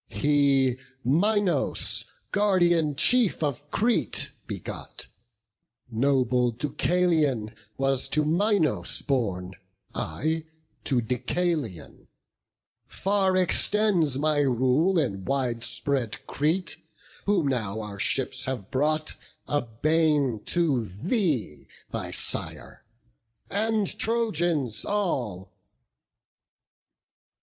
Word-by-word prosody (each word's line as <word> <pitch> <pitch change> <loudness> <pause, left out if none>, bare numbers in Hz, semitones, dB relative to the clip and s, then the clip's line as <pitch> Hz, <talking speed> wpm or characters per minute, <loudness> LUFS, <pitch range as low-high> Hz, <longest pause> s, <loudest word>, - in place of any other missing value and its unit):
He 140 -3 +2 0.3
Minos, 175 - +2 0.3
guardian 175 -7 +2
chief 230 - +4
of 145 0 -3
Crete, 230 +2 +1 0.2
begot; - - -6 0.9
Noble 125 0 +2
Deucalion 150 -3 0 0.2
was 135 -1 0
to 150 0 +2
Minos 160 - +1
born, 95 -9 -1 0.4
I 155 - -2 0.4
to 130 -4 +1
Deucalion; 125 - -3 0.8
far 195 -1 +1
extends 185 -5 +3
my 150 +1 +1
rule 135 +7 +2
In 95 - -1
wide 120 +1 -1
spread 125 -3 -1
Crete; 155 +3 0 0.5
whom 195 -6 +2
now 110 -5 -2
our 105 -2 -8
ships 130 +2 0
have 125 -7 -5
brought, 155 +3 0 0.3
A 145 0 +1
bane 145 0 +1
to 155 -9 +1
thee, 130 - -2 0.2
thy - - -4
sire, - - -3 0.7
and 215 0 +1
Trojans 175 - 0
all." 130 - -2
145 Hz, 85 wpm, -26 LUFS, 125-175 Hz, 0.9 s, chief